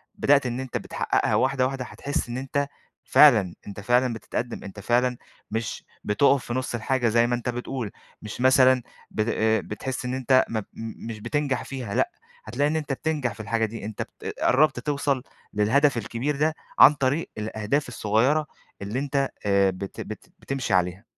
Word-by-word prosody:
بدأت 140 -1 +3
إن 120 +1 -2
أنت 130 -2 -3
بتحققها - - 0
واحدة، 130 -1 +2
واحدة، 130 -1 -3
هتحس 140 -3 -3
إن 120 - -3
أنت 140 +2 -1 0.4
فعلًا، 110 - +6
أنت 100 0 -7
فعلًا 125 +2 +2
بتتقدم، 115 +1 -4
أنت 100 +1 -9
فعلًا 125 +3 +1 0.3
مش 115 0 -3 0.2
بتقف 135 +5 +3
في 120 - -4
نُص 130 -1 -2
الحاجة 120 +2 0
زي 115 +1 +3
ما 120 - +1
أنت 120 0 -3
بتقول، 125 -2 -4 0.3
مش 105 +3 -7
مثلًا 130 -1 +5 0.3
بت 110 - 0 0.4
بتحس 125 +4 -4
إن 125 - -2
أنت 130 0 +3
م 110 -1 -1 0.5
مش 110 -2 -6
بتنجح 145 +1 -1
فيها، 125 -6 -5
لأ، 355 - +2 0.3
هتلاقي 145 +1 0
إن 155 - -1
أنت 150 -3 -1
بتنجح 145 -4 -1
في - - -18
الحاجة 115 +1 0
دي، 110 -1 -7
أنت 110 - -5 0.2
ب - - -4
قربت 135 -1 +3
توصل 140 -1 -1 0.3
للهدف 125 +6 +3
الكبير 115 +6 -2
ده، 155 +2 +1 0.2
عن 150 - +10
طريق 140 +3 0
الأهداف 110 +6 -1
الصغيرة 125 +7 +1 0.3
اللي 105 +6 -3
أنت 140 -1 0 0.2
آآ، 100 -1 +4
بت 95 +1 -7
بت - - -8
بتمشي 135 -6 -3
عليها. 90 +3 +1
125 Hz, 170 wpm, -25 LUFS, 110-140 Hz, 0.5 s, عن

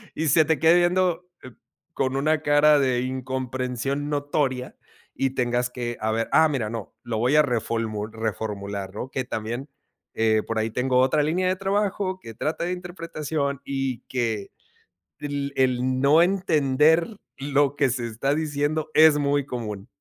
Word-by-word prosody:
y 160 - -1
se 155 +1 +5
te 160 0 +1
quede 165 +1 +5
viendo, 180 0 +2 0.2
eh, 130 - -10 0.4
con 130 0 -1
una 155 +2 +1
cara 145 0 +5
de 130 -2 +1
incomprensión 130 +2 -3
notoria, 145 -3 -1 0.4
y 135 -1 -1
tengas 125 -1 0
que 120 -1 -5
a 110 0 -1
ver: 115 +1 -1
"Ah, 160 - +6
mira, 130 -8 -2
no, 115 -2 -6
lo 115 -2 -3
voy 125 +6 +2
a 150 - +7
reformu 115 -5 -2
reformular", 100 -3 -4
¿no? 130 - -5
Que 130 -1 -2
también, 120 +5 -4 0.4
eh, 110 -1 +2
por 115 -1 -2
ahí 110 - 0
tengo 125 +1 +1
otra 140 +3 +3
línea 180 +5 0
de 185 - +1
trabajo, 195 -1 -1
que 115 -9 -10
trata 155 +9 -3
de 175 - -1
interpretación, 160 -5 -4
y 135 -3 -2
que 115 -5 -2 0.7
el 140 -1 -4
el 130 0 +1
no 145 +4 +5
entender 160 -4 +3 0.3
lo 140 0 +1
que 140 - +3
se 120 -1 -2
está 130 +6 -1
diciendo 155 0 -1
es 155 -1 +7
muy 145 -1 +1
común. 105 -6 -5
135 Hz, 160 wpm, -24 LUFS, 120-155 Hz, 0.7 s, a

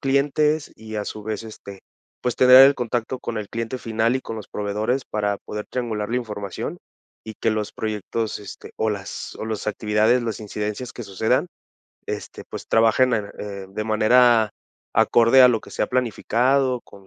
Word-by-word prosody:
clientes 145 +3 +1
y 110 0 -8
a 105 - -2
su 105 - -6
vez, 110 +1 -4
este, 100 -3 -10 0.4
pues 125 -2 -1
tener 130 +1 +9
el 140 - +4
contacto 120 +1 -2
con 115 -2 -4
el 105 - -5
cliente 115 +2 -4
final 115 +2 0
y - - -4
con 115 - -7
los 110 - -8
proveedores 105 +5 -2
para 105 -1 -1
poder 105 0 -7
triangular 110 -4 -2
la 120 - -1
información 105 -5 -5 0.5
y 110 - -8
que 115 - 0
los 110 -1 -2
proyectos, 110 +1 -3
este 100 - -10
o 110 0 0
las 100 -2 -6
o - - -4
los 110 -1 -3
actividades, 110 +3 +2
las 110 -2 -3
incidencias 105 +3 -4
que 120 - -7
sucedan, 110 - 0 0.6
este, - - -6
pues - - -7
trabajen 115 +2 +4
en 105 -2 -1
en, - - -12
eh, 100 -2 -6
de 105 +2 -4
manera 110 0 +4 0.5
acorde 120 +3 +6
a 125 - +9
lo 115 -3 +1
que - - -14
se - - -1
ha - - 0
planificado, 125 +1 +1
con 100 -1 -17
110 Hz, 185 wpm, -23 LUFS, 105-125 Hz, 0.6 s, tener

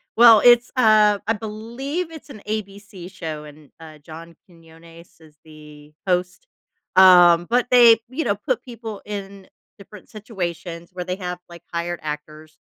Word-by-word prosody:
Well, 230 -2 +7
it's, 240 0 +5
uh 215 -4 +4
I 225 - +2
believe 235 - -6
it's 315 -2 -13
an 215 -7 -12
ABC 200 -3 -7
show, 155 -5 -7
and, 150 0 -16
uh, 160 -1 -13
John 165 +3 -13
Quiñones 165 -1 -19
is 155 -2 -21
the 150 -1 -16 0.2
host. 180 - -2 0.5
Um, 175 -2 +6
but 245 +1 +1
they, 235 -2 +6
you 280 +6 -4
know, - - -1
put - - -3
people 225 -4 -9
in 200 -2 -8 0.3
different 200 -1 -15
situations 175 -5 -7
where 180 -1 -5
they 180 - -4
have, 180 -2 -6
like, 170 -1 -14
hired 170 +1 -4
actors. 155 +1 -9
185 Hz, 150 wpm, -21 LUFS, 165-220 Hz, 0.5 s, Well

